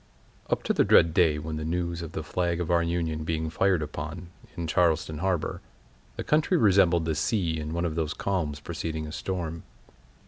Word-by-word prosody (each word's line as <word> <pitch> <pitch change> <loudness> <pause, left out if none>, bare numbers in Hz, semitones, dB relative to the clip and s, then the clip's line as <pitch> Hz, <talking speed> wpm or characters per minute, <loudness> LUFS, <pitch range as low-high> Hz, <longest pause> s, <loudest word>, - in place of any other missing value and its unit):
Up - - 0
to - - +1
the - - +4
dread 80 -1 +5
day 80 -4 +4
when 80 +1 -4
the 80 - -4
news 85 +1 -2
of 85 - -7
the 80 - -3
flag 85 +2 -1
of 85 -1 -2
our 85 -1 +4
Union 85 -2 -1
being 80 0 -2
fired 95 -2 +2
upon, 80 +4 -6 0.3
in 85 - -2
Charleston 80 -2 +1
harbor, 95 -2 -1 0.5
the - - -4
country 155 +4 +2
resembled 95 - +4
the 80 - 0
sea 85 -1 0
in 75 0 -5
one 85 +1 -1
of 80 - -1
those 80 -1 -2
calms 80 -7 -2
preceding 80 +1 -4
a 75 - -7
storm. 85 -2 -4
85 Hz, 195 wpm, -27 LUFS, 80-90 Hz, 0.5 s, dread